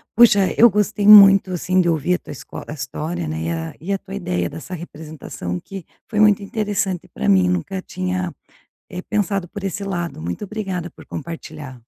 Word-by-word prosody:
Puxa, 205 Hz, -5 st, +6 dB
eu 235 Hz, +1 st, +8 dB
gostei 210 Hz, 0 st, 0 dB
muito, 195 Hz, -2 st, +9 dB
assim, 185 Hz, +1 st, +1 dB
de 175 Hz, -, +1 dB
ouvir 165 Hz, +3 st, +1 dB
a -, -, -4 dB
tua -, -, -11 dB
escola 130 Hz, +2 st, -9 dB
história, 155 Hz, -, -4 dB
né, 80 Hz, +1 st, -3 dB
e 85 Hz, -, -2 dB
a 80 Hz, +3 st, -4 dB
e 195 Hz, +4 st, -2 dB
a -, -, +1 dB
tua 190 Hz, -, -12 dB
ideia 90 Hz, -, -2 dB
dessa 180 Hz, +3 st, -9 dB
representação, 155 Hz, -, -7 dB
que 195 Hz, -4 st, -9 dB, 0.2 s
foi 215 Hz, -2 st, -2 dB
muito 210 Hz, -1 st, +5 dB
interessante 200 Hz, -4 st, -2 dB
para -, -, -4 dB
mim. 95 Hz, -2 st, +5 dB
Nunca 90 Hz, -, -2 dB
tinha, 185 Hz, -1 st, -3 dB, 0.6 s
eh, 180 Hz, -1 st, -6 dB
pensado 200 Hz, -3 st, -1 dB
por 205 Hz, -1 st, -8 dB
esse 195 Hz, +1 st, -3 dB
lado. 175 Hz, -, -4 dB
Muito 85 Hz, -, -4 dB
obrigada 190 Hz, -4 st, -4 dB
por -, -, -15 dB
compartilhar. 155 Hz, -4 st, -7 dB
185 Hz, 185 wpm, -20 LUFS, 155-200 Hz, 0.6 s, muito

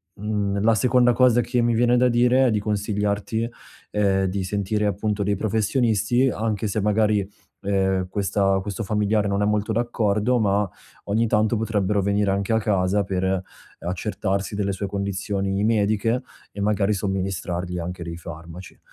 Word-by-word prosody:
uhm, 100 Hz, -1 st, -2 dB
la 115 Hz, +1 st, +4 dB
seconda 125 Hz, +1 st, +4 dB
cosa 125 Hz, -1 st, +4 dB
che 120 Hz, 0 st, -1 dB
mi 120 Hz, 0 st, +2 dB
viene 120 Hz, +2 st, +3 dB
da 125 Hz, +1 st, +4 dB
dire 125 Hz, +2 st, +4 dB
e -, -, +2 dB
di 105 Hz, -, +1 dB
consigliarti, 105 Hz, +2 st, -1 dB, 0.4 s
ehm, 100 Hz, -2 st, +2 dB
di 95 Hz, +1 st, -2 dB
sentire, 105 Hz, +2 st, -1 dB
appunto, 100 Hz, +1 st, -1 dB
dei 100 Hz, +1 st, +1 dB
professionisti. 110 Hz, +3 st, +1 dB
Anche 110 Hz, -2 st, -2 dB
se 105 Hz, +2 st, -1 dB
magari, 105 Hz, -1 st, +2 dB, 0.4 s
ehm, 95 Hz, -2 st, +1 dB
questa 95 Hz, 0 st, +1 dB
questo 105 Hz, +3 st, -4 dB
familiare 105 Hz, +1 st, +1 dB
non 100 Hz, 0 st, 0 dB
è 105 Hz, -, +2 dB
molto 105 Hz, +1 st, 0 dB
d'accordo, 115 Hz, 0 st, +1 dB
ma 100 Hz, -2 st, +1 dB, 0.4 s
ogni 110 Hz, +3 st, +1 dB
tanto 110 Hz, +1 st, +2 dB
potrebbero 105 Hz, -2 st, 0 dB
venire 100 Hz, +1 st, +1 dB
anche 100 Hz, +3 st, 0 dB
a 110 Hz, -, +3 dB
casa 100 Hz, -1 st, +1 dB
per, 95 Hz, -1 st, -2 dB
ehm, 95 Hz, 0 st, +1 dB, 0.4 s
accertarsi 95 Hz, +2 st, -2 dB
delle 100 Hz, -1 st, -1 dB
sue 100 Hz, +1 st, -4 dB
condizioni 100 Hz, 0 st, -2 dB
mediche, 110 Hz, +2 st, +1 dB, 0.3 s
e 100 Hz, -, -7 dB
magari 105 Hz, 0 st, +1 dB
somministrargli 95 Hz, -2 st, -3 dB
anche 90 Hz, +1 st, -5 dB
dei 85 Hz, -1 st, -6 dB
farmaci. 85 Hz, +1 st, -10 dB
105 Hz, 160 wpm, -23 LUFS, 95-110 Hz, 0.4 s, la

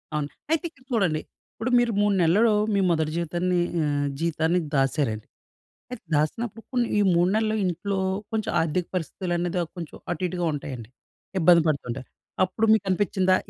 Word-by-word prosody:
అవును. 150 Hz, -1 st, -1 dB, 0.2 s
అయితే 325 Hz, +1 st, +2 dB
ఇక్కడ 260 Hz, -5 st, -25 dB
చూడండి. 180 Hz, -9 st, +1 dB, 0.3 s
ఇప్పుడు 225 Hz, +3 st, -3 dB
మీరు 240 Hz, -1 st, +2 dB
3 205 Hz, -1 st, +3 dB
నెలలలో, 205 Hz, +7 st, +4 dB, 0.2 s
మీ 200 Hz, -, +2 dB
మొదటి 160 Hz, -2 st, +1 dB
జీవితాన్ని 175 Hz, +2 st, 0 dB, 0.3 s
ఆహ్, 145 Hz, -1 st, 0 dB
జీతాన్ని 165 Hz, +1 st, +1 dB, 0.2 s
దాసారండి. 135 Hz, -5 st, 0 dB, 0.6 s
అయితే 250 Hz, -, -7 dB
దాసినప్పుడు 225 Hz, +10 st, -1 dB
కొన్ని 245 Hz, -2 st, +2 dB
ఈ -, -, +4 dB
3 175 Hz, +1 st, +3 dB
నెలలు 220 Hz, 0 st, +1 dB
ఇంట్లో, 190 Hz, +3 st, -1 dB, 0.3 s
కొంచెం 220 Hz, 0 st, -1 dB
ఆర్థిక 165 Hz, +2 st, 0 dB
పరిస్థితులనేది 175 Hz, 0 st, -2 dB
అ -, -, -4 dB
కొంచెం 165 Hz, -3 st, -7 dB
అటు 175 Hz, +1 st, -3 dB
ఇటుగా 175 Hz, -1 st, -2 dB
ఉంటాయండి. 130 Hz, -6 st, -6 dB, 0.5 s
ఇబ్బంది 170 Hz, -1 st, +6 dB
పెడుతుంటాయి. 135 Hz, -4 st, -2 dB, 0.4 s
అప్పుడు 190 Hz, +4 st, 0 dB
మీకనిపిచ్చిందా 190 Hz, -2 st, +2 dB
175 Hz, 145 wpm, -25 LUFS, 155-205 Hz, 0.6 s, ఇబ్బంది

